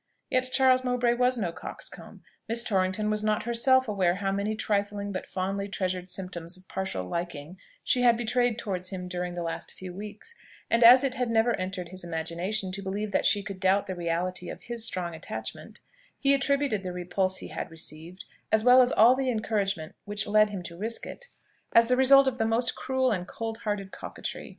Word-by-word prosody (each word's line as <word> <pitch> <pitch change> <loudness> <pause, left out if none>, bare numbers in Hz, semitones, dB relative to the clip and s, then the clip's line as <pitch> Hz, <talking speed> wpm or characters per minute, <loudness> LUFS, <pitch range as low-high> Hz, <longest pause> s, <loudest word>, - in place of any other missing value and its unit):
Yet 255 0 +2
Charles 255 -1 +4
Mowbray 250 -1 +2
was 250 +1 +2
no 185 -7 -1
coxcomb. - - -8 0.3
Miss 235 +1 +1
Torrington 200 +1 0
was 215 0 0
not 215 0 +1
herself 260 +2 +3
aware 185 -4 +1
how 195 0 -1
many 200 +2 -1
trifling 205 -1 -1
but 185 - -5
fondly 195 +2 -2
treasured 185 -2 -3
symptoms 180 -2 -5
of 185 0 -21
partial 190 - -3
liking 170 - -5 0.2
she 250 - +2
had 240 -2 +5
betrayed 240 0 +1
towards 185 -5 -3
him 180 -2 -5
during 180 0 -4
the 175 - -3
last 165 0 -5
few 185 -1 -8
weeks; 210 - -8 0.4
and 230 +1 +4
as 250 +4 +9
it 270 -2 0 0.2
never 230 +1 +3
entered 185 -2 -4
his 185 -1 -7
imagination 175 +4 -3
to 195 +2 -5
believe 200 +2 -3
that - - +2
she 205 - +2
could 195 -1 -7
doubt 190 +1 +3
the 190 - -4
reality 175 +1 -2
of - - -8
his 235 -2 -5
strong 180 -6 -2
attachment, 155 - -7 0.4
he 275 0 +3
attributed 275 -5 +1
the 185 -1 -5
repulse 185 +1 -1
he - - -8
had - - -5
received, 165 +2 -8 0.3
as 220 0 +3
well 250 +1 +8
as 250 0 +3
all 230 +4 +6
the 265 -1 -1
encouragement 205 -7 -1
which 205 0 -1
led 215 0 +4
him 195 -3 -5
to 170 - -7
risk 220 +6 -3
it, - - -9 0.5
as 230 +1 +6
the 250 - +4
result 275 +1 +7
of 255 -1 -1
the 225 - +2
most 230 +2 +1
cruel 260 -1 0
and 180 -4 -2
cold 225 0 -5
hearted 205 -3 -3
coquetry. - - -7
200 Hz, 200 wpm, -28 LUFS, 185-235 Hz, 0.5 s, as